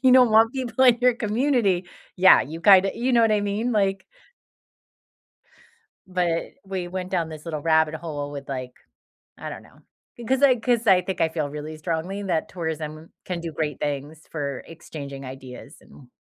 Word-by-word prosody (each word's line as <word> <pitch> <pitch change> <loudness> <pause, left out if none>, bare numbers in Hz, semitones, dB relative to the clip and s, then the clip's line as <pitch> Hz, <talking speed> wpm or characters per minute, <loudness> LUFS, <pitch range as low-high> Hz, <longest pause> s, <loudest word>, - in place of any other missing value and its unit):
you 260 -1 +6
don't 250 -2 +6
want 225 +2 +5
people 260 -1 0
in 245 -2 +6
your 250 -1 +4
community. 225 -4 +1 0.3
Yeah, 190 +1 +7
you 160 +3 -8
kinda 195 +1 +6
you 250 +2 -1
know 235 - +5
what 225 -1 +4
I 210 - +2
mean? 205 +4 -1
Like 195 -3 +1 2.0
but 180 -3 0 0.2
we 190 -2 -4
went 185 0 -5
down 175 -3 -1
this 155 0 -10
little 155 -3 -4
rabbit 160 0 +2
hole 145 -3 -5
with, 140 -1 -8
like, 130 -2 -5 0.6
I - - -7
don't - - -8
know. - - -20 0.4
Because 255 +3 -1
I 265 -3 +6
'cause 235 0 0
I 190 -3 +6
think 190 +1 -5
I 160 - +3
feel 155 -2 -3
really 150 +2 -7
strongly 170 +5 -3
that 170 -5 -1
tourism 160 -2 -5
can 180 -2 -4
do 165 -1 -6
great 150 -3 -3
things 145 +2 -4
for 140 -4 -4
exchanging 140 -4 -9
ideas 130 -1 -10
and 130 - -17
175 Hz, 180 wpm, -24 LUFS, 155-215 Hz, 2.0 s, Yeah